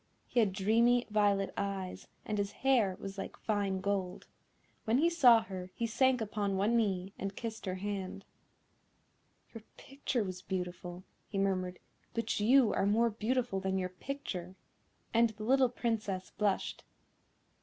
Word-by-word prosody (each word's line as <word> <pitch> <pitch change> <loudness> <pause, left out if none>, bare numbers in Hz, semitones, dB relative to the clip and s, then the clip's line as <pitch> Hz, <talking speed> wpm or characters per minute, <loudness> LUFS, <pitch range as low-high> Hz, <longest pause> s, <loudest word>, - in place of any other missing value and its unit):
He 245 - 0
had 215 -4 +4
dreamy 230 +5 +3
violet 200 -2 +2
eyes, 195 -2 -4 0.2
and 210 -1 -2
his 200 0 -1
hair 230 -9 +3
was 195 0 -6
like - - -6
fine 200 -3 -1
gold. 195 -2 -2 0.6
When 225 +2 +3
he 335 +5 +3
saw 245 -9 +6
her 185 -1 -7
he 235 - -1
sank 255 +2 +2
upon 205 -2 -1
one 210 +5 +2
knee, 195 -4 0
and 195 +1 -4
kissed 225 -3 -6
her 185 - -1
hand. 195 0 -4 1.3
"Your 225 - -8 0.2
picture 270 -4 -2
was 185 -2 -5
beautiful," 180 -1 -5 0.2
he 200 - -5
murmured, 185 -2 0 0.4
"but 230 -2 -1
you 235 +2 +5
are 195 - +1
more 230 +3 +3
beautiful 230 -1 -1
than 190 0 -1
your 185 -1 -1
picture;" 185 -4 -6 0.6
and 230 0 +5
the 215 0 -9
little 260 +2 +4
Princess 215 -6 -2
blushed. 205 -2 -1
205 Hz, 150 wpm, -33 LUFS, 190-230 Hz, 1.3 s, saw